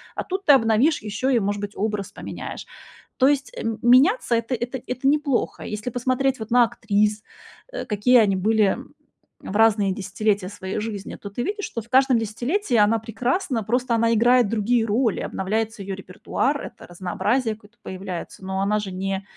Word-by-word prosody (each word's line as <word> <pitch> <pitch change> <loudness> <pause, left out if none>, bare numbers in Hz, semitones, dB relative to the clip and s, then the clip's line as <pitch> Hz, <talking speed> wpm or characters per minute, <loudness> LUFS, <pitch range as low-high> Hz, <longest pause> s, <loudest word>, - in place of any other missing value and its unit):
А - - -3
тут 385 +1 -4
ты 290 - +8
обновишь 250 +5 +3
ещё 215 +5 -2
и, 250 -3 +3
может 205 0 -2
быть, 205 0 -5
образ 210 -1 -2
поменяешь. - - -7 0.5
То 260 - +5
есть, 280 -1 +1
э, - - -4 0.2
меняться 255 - +5
это 230 +2 -1
это 240 +2 -4
это 255 +2 -2
неплохо. 290 -3 0
Если 210 +3 -5
посмотреть 255 +2 0
вот 220 0 -6
на 245 0 +6
актрис, 210 -2 0 0.5
э, - - -4
какие 225 +4 +3
они 200 -3 +3
были 210 +1 +2 0.6
в 195 - -7
разные 215 -3 +4
десятилетия 200 0 -1
своей 190 -1 -5
жизни, 210 -3 -5
то 200 - -9
ты 220 +5 -4
видишь, 410 - -3
что 230 - -5
в 230 - -18
каждом 265 -1 +4
десятилетии 240 - -1
она 225 +2 +2
прекрасна, 245 - -2
просто 245 +3 0
она 230 0 +2
играет 240 0 +4
другие 230 +2 +1
роли. 225 0 +1
Обновляется 215 +2 -2
её 195 0 -4
репертуар, 200 +9 -2
это - - -10
разнообразие 195 +7 -1
какое-то 215 +2 -22
появляется, 185 -1 -7
но 190 0 -2
она 210 +2 +1
же 205 -2 -5
не 195 +1 -3
225 Hz, 175 wpm, -23 LUFS, 205-250 Hz, 0.6 s, ты